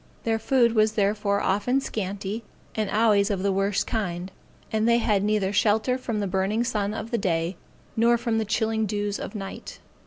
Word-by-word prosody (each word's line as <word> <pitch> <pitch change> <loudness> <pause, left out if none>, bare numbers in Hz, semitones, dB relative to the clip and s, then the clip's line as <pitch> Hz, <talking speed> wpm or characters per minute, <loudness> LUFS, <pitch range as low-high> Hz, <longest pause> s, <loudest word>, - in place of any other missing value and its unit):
Their 225 -1 0
food 235 0 +3
was 215 -1 +3
therefore 205 -1 +1
often 210 +7 +1
scanty, 205 -2 -4 0.3
and 215 -2 -1
always 210 -2 +3
of 195 -2 -1
the 200 - +2
worst 195 +1 0
kind; 185 -4 -3 0.4
and 220 +1 +2
they 235 - +5
had 210 -4 +1
neither 205 -2 +1
shelter 220 +4 +2
from 235 -4 -3
the - - 0
burning 195 +4 0
sun 210 -3 -1
of 225 +1 -6
the 235 - 0
day, 170 -1 0 0.4
nor 235 +1 +4
from 230 -1 -1
the 220 - -1
chilling 220 +1 0
dews 205 0 -2
of 210 - -6
night. 195 -2 -7
210 Hz, 185 wpm, -25 LUFS, 200-225 Hz, 0.4 s, they